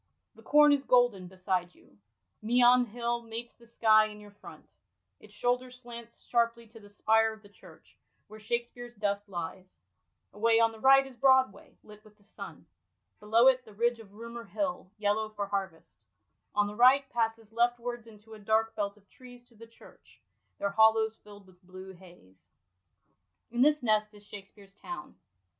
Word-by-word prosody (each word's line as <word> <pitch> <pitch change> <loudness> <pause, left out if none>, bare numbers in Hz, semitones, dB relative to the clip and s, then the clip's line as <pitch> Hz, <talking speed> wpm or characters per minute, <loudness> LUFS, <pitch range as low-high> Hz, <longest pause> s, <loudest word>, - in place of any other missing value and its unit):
The - - -18
corn 295 0 +5
is 280 -1 0
golden 245 -8 +2
beside 185 -1 -3
you. 100 - -24 0.4
Meon 245 +2 +4
Hill 235 +1 -3
meets 230 +1 -7
the 235 - -21
sky 215 -2 +4
in 210 0 -11
your 210 0 -14
front; 205 - -14 0.5
its - - -17
shoulder 250 +1 -1
slants 235 -2 -12
sharply 235 -1 0
to 225 0 -15
the 205 -1 -16
spire 220 +2 +2
of 220 0 -16
the 205 - -17
church 205 - -19 0.3
where 215 +1 -13
Shakspere's 240 +2 -5
dust 205 0 -3
lies: 185 +1 -7 0.6
away 225 +2 +2
on 230 0 +3
the 225 - -13
right 270 +2 +6
is 265 -2 -13
Broadway, 265 +3 +2
lit 210 0 -16
with 210 -1 -21
the 205 - -28
sun; - - -11 0.5
below 225 +3 +3
it, 260 -1 +4
the 215 -4 -17
ridge 235 +2 0
of 205 -3 -15
Roomer 235 +1 -9
Hill, 270 -10 -4
yellow 210 +1 0
for 210 -1 -4
harvest, 190 -5 -5 0.6
on 205 0 +3
the 205 - -6
right, 255 +5 +5
passes 225 -2 -2
leftwards 240 0 -1
into 220 0 -16
a 215 - -11
dark 220 +2 0
belt 200 0 -3
of 200 -1 -25
trees 245 +1 -15
to 235 - -23
the 230 +1 -14
church, 230 - -20 0.4
their 200 - -2
hollows 220 +1 +3
filld 205 -1 -15
with 185 -1 -22
blue 185 +1 -11
haze. 175 - -19 1.0
In 240 +1 -1
this 295 0 +3
nest 215 -2 +1
is 205 - -16
Shakspere's 200 -1 -12
town. 350 - -9
225 Hz, 175 wpm, -29 LUFS, 205-240 Hz, 1.0 s, right